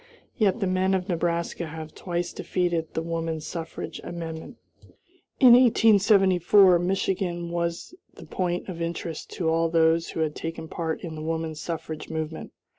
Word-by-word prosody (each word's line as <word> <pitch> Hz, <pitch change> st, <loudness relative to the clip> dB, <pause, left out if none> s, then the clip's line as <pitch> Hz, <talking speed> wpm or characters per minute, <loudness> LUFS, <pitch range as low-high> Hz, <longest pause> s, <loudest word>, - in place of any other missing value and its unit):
Yet 210 Hz, 0 st, +2 dB
the -, -, +2 dB
men 185 Hz, +1 st, +1 dB
of 185 Hz, 0 st, -2 dB
Nebraska 170 Hz, -1 st, -1 dB
have 155 Hz, 0 st, -8 dB
twice 175 Hz, -1 st, -3 dB
defeated 175 Hz, -3 st, -2 dB
the 160 Hz, -, -1 dB
woman 165 Hz, -1 st, -3 dB
suffrage 165 Hz, +1 st, -6 dB
amendment. 165 Hz, -2 st, -7 dB, 0.8 s
In 250 Hz, -3 st, +9 dB
1874 200 Hz, -6 st, +5 dB
Michigan 175 Hz, -1 st, -1 dB
was 170 Hz, -, -3 dB, 0.2 s
the -, -, -12 dB
point 175 Hz, -1 st, -2 dB
of 175 Hz, -3 st, -6 dB
interest 165 Hz, -1 st, -4 dB
to 170 Hz, -, -2 dB
all 165 Hz, +1 st, +2 dB
those 165 Hz, 0 st, +3 dB
who 160 Hz, -, -3 dB
had 155 Hz, -1 st, 0 dB
taken 165 Hz, 0 st, -5 dB
part 160 Hz, 0 st, -3 dB
in 165 Hz, -3 st, -6 dB
the 155 Hz, -, -7 dB
woman 160 Hz, 0 st, -2 dB
suffrage 155 Hz, 0 st, -6 dB
movement. 160 Hz, 0 st, -5 dB
170 Hz, 150 wpm, -26 LUFS, 160-185 Hz, 0.8 s, In